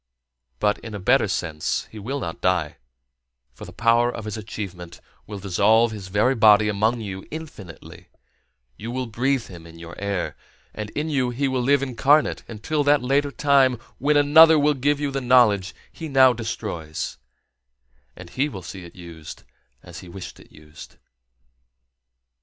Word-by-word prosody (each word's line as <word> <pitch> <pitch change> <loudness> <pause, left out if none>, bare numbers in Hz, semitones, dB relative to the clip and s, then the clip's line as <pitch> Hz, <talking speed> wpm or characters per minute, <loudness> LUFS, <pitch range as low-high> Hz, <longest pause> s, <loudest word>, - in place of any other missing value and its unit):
But, 105 +8 0
in 110 -2 -8
a - - -5
better 120 +5 +3
sense, 80 -5 -3
he 110 - -9
will 130 +8 -4
not 85 -9 -6
die, 90 -5 0 0.8
for - - -11
the - - -11
power 120 +1 +2
of 110 - -8
his 105 - -5
achievement 95 -5 -8 0.3
will 105 - -7
dissolve 105 +4 +2
his 105 -3 -8
very 105 +7 +2
body 110 -3 +5
among 110 +3 0
you 95 -3 -7
infinitely; 145 - -10 0.7
you 115 - -7
will 130 +1 -3
breathe 125 +2 -1
him 85 -3 -12
in 85 0 -14
your 85 0 -10
air; 100 -2 -3 0.4
and 105 -1 -6
in 155 +1 -2
you 130 -4 0
he 135 +3 -1
will 130 -1 -1
live 140 +2 +2
incarnate 140 +4 +2
until 145 +7 -2
that 145 -1 +3
later 140 +3 +1
time 140 -3 +3 0.2
when 145 +3 +2
another 160 +3 +7
will 150 0 +3
give 145 +2 0
you 145 -1 -2
the 135 0 -3
knowledge 120 -7 +3 0.2
he 165 - -8
now 130 -2 +5
destroys, 90 - -5 1.0
and 90 -1 -12
he 140 +3 -1
will 95 -9 -9
see 90 +2 -9
it 85 - -13
used 85 -3 -11 0.4
as - - -10
he 90 - -12
wished 95 +1 -9
it - - -18
used. 75 +1 -14
110 Hz, 165 wpm, -23 LUFS, 95-135 Hz, 1.0 s, another